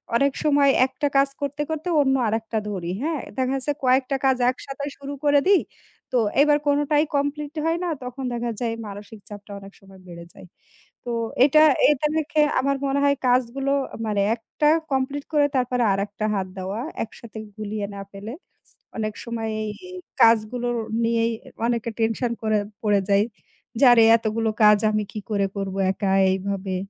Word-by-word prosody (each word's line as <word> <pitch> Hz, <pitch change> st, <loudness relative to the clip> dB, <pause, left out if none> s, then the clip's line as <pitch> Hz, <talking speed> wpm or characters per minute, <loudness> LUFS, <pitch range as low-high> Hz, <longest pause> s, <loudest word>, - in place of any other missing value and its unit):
অনেক 280 Hz, +2 st, +2 dB
সময় 285 Hz, -2 st, +4 dB, 0.2 s
একটা 275 Hz, +3 st, -2 dB
কাজ 275 Hz, 0 st, +4 dB
করতে, 285 Hz, +1 st, -3 dB
করতে, 315 Hz, +2 st, -4 dB
অন্য 265 Hz, -1 st, +2 dB
আরেকটা 225 Hz, +1 st, -2 dB
ধরি, 180 Hz, -4 st, -4 dB
হ্যাঁ? 315 Hz, -2 st, -1 dB, 0.2 s
দেখা 260 Hz, +1 st, 0 dB
যাচ্ছে 290 Hz, +2 st, -1 dB
কয়েকটা 260 Hz, +1 st, +2 dB
কাজ 265 Hz, -1 st, +3 dB
একসাথে 275 Hz, +2 st, -7 dB
শুরু 280 Hz, 0 st, -7 dB
করে 290 Hz, -1 st, +5 dB
দিই। 395 Hz, -2 st, +5 dB, 0.5 s
তো 250 Hz, -, +3 dB, 0.2 s
এবার 295 Hz, 0 st, +5 dB
কোনটাই 290 Hz, +1 st, +2 dB
complete 290 Hz, +2 st, -2 dB
হয় 330 Hz, +1 st, +1 dB
না। 355 Hz, -, -1 dB
তখন 255 Hz, +2 st, -6 dB
দেখা 235 Hz, 0 st, -2 dB
যায় 230 Hz, -2 st, -1 dB
মানসিক 205 Hz, +2 st, -10 dB
চাপটা 205 Hz, 0 st, -10 dB
অনেক 195 Hz, 0 st, -13 dB
সময় 195 Hz, -1 st, -17 dB
বেড়ে 170 Hz, -1 st, -10 dB
যায়। 180 Hz, -, -14 dB, 0.6 s
তো 240 Hz, -, -5 dB, 0.3 s
এটা, 305 Hz, +2 st, +5 dB, 0.3 s
এটা, 295 Hz, 0 st, +1 dB
দেখে 310 Hz, 0 st, 0 dB, 0.2 s
আমার 275 Hz, +1 st, 0 dB
মনে 275 Hz, +1 st, 0 dB
হয় 280 Hz, 0 st, +3 dB
কাজগুলো 255 Hz, +2 st, +1 dB, 0.4 s
মানে 210 Hz, -2 st, 0 dB, 0.2 s
একটা 270 Hz, +6 st, -1 dB, 0.2 s
complete 270 Hz, +2 st, -1 dB
করে 295 Hz, -1 st, +4 dB
তারপরে 250 Hz, -1 st, 0 dB
আরেকটা 205 Hz, +2 st, -3 dB
হাত 195 Hz, -2 st, -1 dB
দেওয়া। 190 Hz, +4 st, -4 dB, 0.2 s
একসাথে 220 Hz, 0 st, -12 dB, 0.2 s
গুলিয়ে 210 Hz, -1 st, -4 dB
না 200 Hz, -, -6 dB
ফেলে। 205 Hz, +4 st, -8 dB, 0.7 s
অনেক 215 Hz, -1 st, -2 dB
সময় 225 Hz, -2 st, -4 dB
এই 215 Hz, -, -3 dB, 0.5 s
কাজগুলো 230 Hz, +2 st, +3 dB, 0.4 s
নিয়েই 230 Hz, 0 st, +1 dB, 0.3 s
অনেকে 235 Hz, -1 st, -1 dB
tension 225 Hz, +2 st, 0 dB
করে 215 Hz, -1 st, +2 dB, 0.2 s
পড়ে 205 Hz, -2 st, +3 dB
যায়। 200 Hz, +1 st, +4 dB, 0.5 s
যে -, -, +4 dB
আরে 235 Hz, -1 st, +6 dB
এতগুলো 225 Hz, 0 st, -1 dB
কাজ 210 Hz, 0 st, +7 dB
আমি 215 Hz, -1 st, 0 dB
কি 220 Hz, -, -5 dB
করে 200 Hz, -2 st, +1 dB
করব 195 Hz, -1 st, -3 dB, 0.2 s
একা 195 Hz, 0 st, -1 dB, 0.2 s
এইভাবে? 190 Hz, 0 st, -2 dB
235 Hz, 165 wpm, -23 LUFS, 210-280 Hz, 0.7 s, কাজ